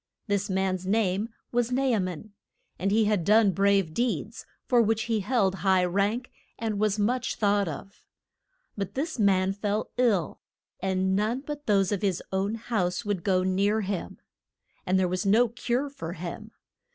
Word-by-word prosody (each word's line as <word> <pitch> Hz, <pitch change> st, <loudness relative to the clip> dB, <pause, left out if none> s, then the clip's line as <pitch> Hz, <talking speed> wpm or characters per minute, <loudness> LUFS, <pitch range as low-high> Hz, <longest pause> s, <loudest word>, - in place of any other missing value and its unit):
This 205 Hz, -1 st, -1 dB
man's 190 Hz, -1 st, -1 dB
name 205 Hz, 0 st, +1 dB, 0.2 s
was 245 Hz, 0 st, 0 dB
Na 260 Hz, +2 st, +1 dB
a 250 Hz, -5 st, +2 dB
man, 185 Hz, +2 st, -4 dB, 0.5 s
and 195 Hz, -, 0 dB
he 215 Hz, +2 st, +3 dB
had 205 Hz, -4 st, +1 dB
done 210 Hz, +2 st, +5 dB
brave 195 Hz, -3 st, +2 dB
deeds, 225 Hz, -, -2 dB, 0.2 s
for 245 Hz, -2 st, +4 dB
which 220 Hz, 0 st, +1 dB
he 225 Hz, -2 st, 0 dB
held 200 Hz, -2 st, +1 dB
high 190 Hz, -2 st, +3 dB
rank, 200 Hz, +7 st, 0 dB, 0.3 s
and 220 Hz, -3 st, -2 dB
was 215 Hz, -1 st, +1 dB
much 240 Hz, +4 st, 0 dB
thought 205 Hz, -2 st, +2 dB
of. 165 Hz, +6 st, -8 dB, 0.7 s
But 200 Hz, -2 st, -4 dB
this 300 Hz, 0 st, -3 dB
man 190 Hz, -2 st, +3 dB
fell 205 Hz, +1 st, -2 dB
ill, 215 Hz, -10 st, +1 dB, 0.4 s
and 190 Hz, 0 st, 0 dB
none 220 Hz, +6 st, 0 dB
but 295 Hz, 0 st, -7 dB
those 195 Hz, -2 st, +3 dB
of 205 Hz, -, -1 dB
his 195 Hz, -4 st, 0 dB
own 195 Hz, +3 st, 0 dB
house 210 Hz, -6 st, -2 dB
would 200 Hz, -4 st, -2 dB
go 185 Hz, -2 st, +2 dB
near 200 Hz, +4 st, +1 dB
him. 190 Hz, -, -4 dB, 0.7 s
And 185 Hz, +1 st, +3 dB
there 185 Hz, -, +2 dB
was 185 Hz, +2 st, -2 dB
no 225 Hz, +4 st, +4 dB
cure 245 Hz, +4 st, -1 dB
for 220 Hz, -13 st, -7 dB
him. 180 Hz, +5 st, -7 dB
205 Hz, 170 wpm, -27 LUFS, 190-225 Hz, 0.7 s, done